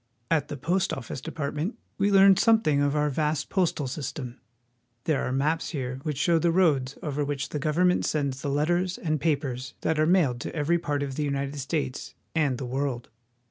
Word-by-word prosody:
At 160 -3 +2
the 145 - -5
Post 170 +7 0
Office 125 -1 -5
Department 150 - -3 0.2
we 200 +1 +3
learn 195 0 +7
something 220 -11 +3
of 145 0 +1
our 150 0 +1
vast 150 +1 -1
postal 175 -6 +1
system. 130 -2 -5 0.6
There 155 -1 +1
are - - -2
maps 150 +5 0
here 130 -4 -4
which 150 -1 -3
show 165 +4 +3
the 170 - +2
roads 145 -7 +2
over 150 -1 -1
which 145 0 -3
the 150 - -3
government 175 +5 +2
sends 140 -3 -1
the 145 - -2
letters 175 +6 +1
and 155 -3 -1
papers 140 -4 -1
that 160 -1 0
are 155 - +3
mailed 155 -9 +3
to - - -5
every 165 +3 +1
part 145 -3 -1
of 135 -2 -5
the 150 - 0
United 140 0 -2
States 135 -1 -3 0.2
and 145 -6 +1
the 130 - -5
world. 130 -1 -2
150 Hz, 190 wpm, -27 LUFS, 135-165 Hz, 0.6 s, learn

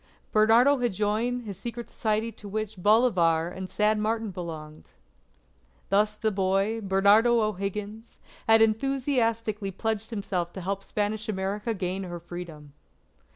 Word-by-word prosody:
Bernardo 230 +6 +5
had 240 -4 0
joined 220 +5 -1
his 200 -4 -8
secret 235 +1 -6
society 220 +1 -1
to 205 -2 -11
which 215 +1 -3
Bolivar 175 -7 +3
and 185 +1 -7
San 210 0 +1
Martin 220 0 -1
belonged. 160 -4 -8 1.0
Thus 210 +2 +2
the 220 0 -1
boy, 195 +3 0
Bernardo 205 +4 +4
O'Higgins, 210 +1 -4 0.3
had 225 0 +7
enthusiastically 230 -3 0
pledged 220 +2 -3
himself 190 -6 -3
to 190 - -6
help 195 +2 -3
Spanish 210 +1 -2
America 205 +3 -2
gain 185 0 -3
her 175 -2 -6
Freedom. 165 -4 -9
210 Hz, 130 wpm, -27 LUFS, 190-225 Hz, 1.0 s, had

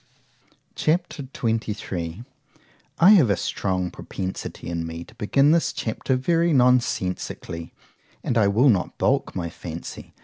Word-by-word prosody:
C 155 - +2
H 175 -2 -3
A - - -3
P. 115 -3 -1
XXIII 90 0 -5 0.7
I 180 +4 +7
HAVE 170 - +6
a 100 - +2
strong 90 0 -2
propensity 95 0 -6
in 85 -1 -3
me 80 +1 -6
to - - -17
begin 135 +7 +3
this 165 0 +2
chapter 120 +3 -2
very 165 +5 +2
nonsensically, 120 - 0 0.5
and - - -1
I 110 -3 +4
will 115 +8 +4
not 100 -6 +1
balk - - +1
my 85 -3 -2
fancy. 85 0 -8
110 Hz, 145 wpm, -24 LUFS, 90-140 Hz, 0.7 s, I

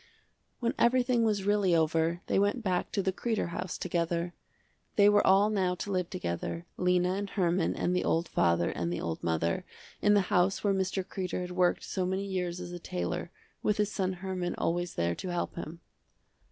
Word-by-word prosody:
When 235 -1 +1
everything 245 0 +3
was 210 -3 +1
really 200 -3 +3
over, 165 +1 +1
they - - +2
went 205 +4 +1
back 185 -3 0
to 195 - +1
the 190 0 0
Kreder 220 -3 -1
house 180 +1 -4
together. 170 0 -1 0.6
They 205 -1 +6
were 205 0 +5
all 200 +3 +5
now 185 -3 +1
to 200 - -5
live 180 -2 0
together, 85 - -4
Lena 180 0 +2
and 200 +1 -3
Herman 175 -3 +1
and 180 - 0
the 180 - +1
old 165 +1 +1
father 85 - +2
and 85 0 -2
the 90 - -2
old 80 -1 -3
mother, 85 0 0 0.4
in 205 0 +5
the 205 - +5
house 180 +1 +3
where 200 -1 +3
Mr. 190 0 0
Kreder 185 -1 -3
had 180 0 -5
worked 180 -1 +2
so 185 -2 -2
many 190 +2 -1
years 180 -2 -2
as 180 -1 -6
a 175 - -6
tailor, 90 - -3 0.3
with 210 - +1
his 210 0 +1
son 190 -2 -1
Herman 185 -1 -3
always 175 +1 -1
there 85 0 +1
to 185 - -6
help 175 -1 -2
him. 170 0 -7
180 Hz, 195 wpm, -30 LUFS, 170-200 Hz, 0.6 s, They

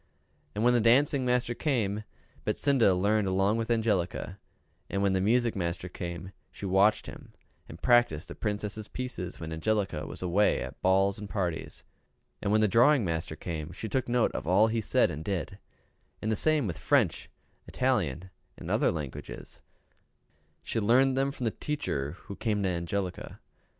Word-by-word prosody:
And 105 - -1
when 125 +1 +5
the 120 - +3
dancing 130 +4 +4
master 125 -1 +1
came, 110 -8 -1 0.4
Betsinda 130 -9 +3
learned 100 +2 +2
along 95 +3 +2
with 115 0 -3
Angelica; 100 -5 0 0.5
and 100 0 -1
when 100 -1 +2
the 95 - +1
music 115 +3 +2
master 85 -1 -2
came, 85 0 -6 0.2
she - - -8
watched 95 +3 +3
him - - -11 0.4
and - - -10
practiced 120 -11 +3
the - - -7
Princess' 105 0 -4
pieces 125 -9 -6
when 80 -1 -5
Angelica 95 -2 -1
was - - -7
away 95 +4 +2
at - - -9
balls 95 +1 +3
and 105 -1 -7
parties; 90 -5 -3 0.6
and 100 - -1
when 110 +1 +4
the 110 - +4
drawing 120 +3 +4
master 80 -2 -3
came, 80 -2 -5
she 110 - -6
took 130 +3 -1
note 120 -1 +2
of - - -5
all 95 +5 +5
he 110 0 0
said - - +2
and 75 +2 -6
did; 90 -3 -3 0.6
and 110 - -2
the - - +2
same 155 +2 +2
with 85 -6 -4
French, - - +1 0.4
Italian, 95 - -1 0.3
and - - -6
all - - +2
other - - +2
languages 75 -6 -7 1.0
she 115 - -2
learned 130 +5 +4
them 135 +1 +1
from 135 -2 -7
the 115 - +1
teacher 75 - -3
who 100 - -8
came 105 -2 -1
to 95 - +1
Angelica. 90 +2 -3
105 Hz, 170 wpm, -29 LUFS, 90-120 Hz, 1.0 s, when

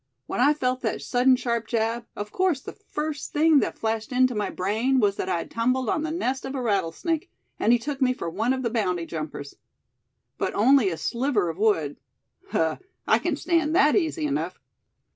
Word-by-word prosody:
When - - -4
I 285 +4 +5
felt 255 -3 -1
that - - -2
sudden 255 +1 +4
sharp 235 -3 -2
jab, 230 0 -1
of 205 0 -5
course 370 -7 +1
the - - -8
first 310 -7 -5
thing 310 0 +5
that - - -2
flashed 220 0 -2
into 255 0 +3
my 210 -2 -1
brain 225 +8 0
was 205 -3 +2
that 185 - -2
I'd 170 -2 -2
tumbled 250 +1 0
on 310 - +1
the 315 - -2
nest 270 -5 -2
of 265 +1 -5
a 260 - -2
rattlesnake, 215 - -1 0.3
and 225 - +3
he 240 - +6
took 275 +3 -5
me 255 -1 +4
for 250 - -4
one 215 +9 0
of 260 0 -1
the 235 - -1
bounty 180 -7 0
jumpers. 155 -3 -6 0.8
But - - -1
only 245 0 +5
a 165 - -4
sliver 235 - 0
of 165 +3 -6
wood 165 -10 +1 0.5
huh, 160 -1 +1 0.3
I - - +4
can - - -1
stand 330 -3 +1
that 300 -5 +5
easy 325 -4 0
enough." 295 0 -2
245 Hz, 200 wpm, -25 LUFS, 210-285 Hz, 0.8 s, he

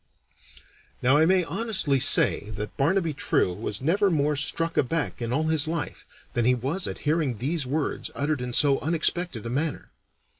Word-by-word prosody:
Now 130 +4 +4
I 160 +1 +4
may 185 0 +3
honestly 190 - 0
say 105 -3 +3
that 105 0 -6
Barnaby 165 +3 +1
True 95 -8 0
was 105 +3 -4
never 195 +6 +2
more 150 -3 +1
struck 165 +4 -1
aback 145 0 -1
in 115 0 -3
all 145 +5 +1
his 155 -1 +1
life 165 -1 -4 0.3
than 120 - 0
he 125 +2 +3
was 140 +10 -1
at - - -5
hearing 150 -6 0
these 140 +4 -2
words 145 +3 -2
uttered 145 -1 -1
in 125 0 -4
so 140 +2 +3
unexpected 165 -5 -1
a - - -3
manner. 145 +4 -3
145 Hz, 175 wpm, -25 LUFS, 125-165 Hz, 0.3 s, Now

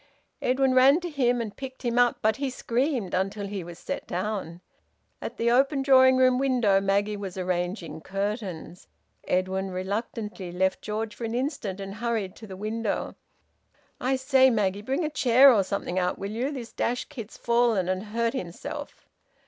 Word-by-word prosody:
Edwin 260 +1 +2
ran 265 +5 +6
to 350 -1 -5
him, 245 -4 +2
and 215 -3 -5
picked 260 -1 -8
him 240 0 +1
up. 245 -1 +4
But 220 0 +2
he 275 -1 -1
screamed 250 - -1
until 195 +2 -1
he 195 -2 -4
was 170 0 -9
set - - -5
down. 180 -2 -3 0.6
At - - -6
the 235 +1 +2
open 270 +3 +3
drawing 260 -1 +6
room 255 -1 +4
window, 245 -8 +3
Maggie 200 +2 +1
was 195 -2 -6
arranging 175 -3 -3
curtains. 195 -3 -4 0.4
Edwin 190 +1 0
reluctantly 200 0 -4
left 185 +1 0
George 215 0 -3
for 235 - -9
an 225 +1 -3
instant 245 - -2
and 195 0 -6
hurried 220 -3 -2
to 220 - -11
the 190 -1 -8
window, 215 +1 -2 0.9
"I 260 +2 +1
say, 265 0 +4
Maggie, 205 -4 0
bring 270 +9 -1
a - - -1
chair 265 -1 +6
or 205 -4 +3
something 185 -1 -2
out, 180 0 0
will 200 +1 -5
you? 240 +5 -1
This 245 -5 -7
dashed 245 +1 -2
kid's 235 -7 -8
fallen 235 -6 +2
and 185 +2 -1
hurt 230 +2 -1
himself." 180 -10 -7
220 Hz, 175 wpm, -26 LUFS, 190-255 Hz, 0.9 s, ran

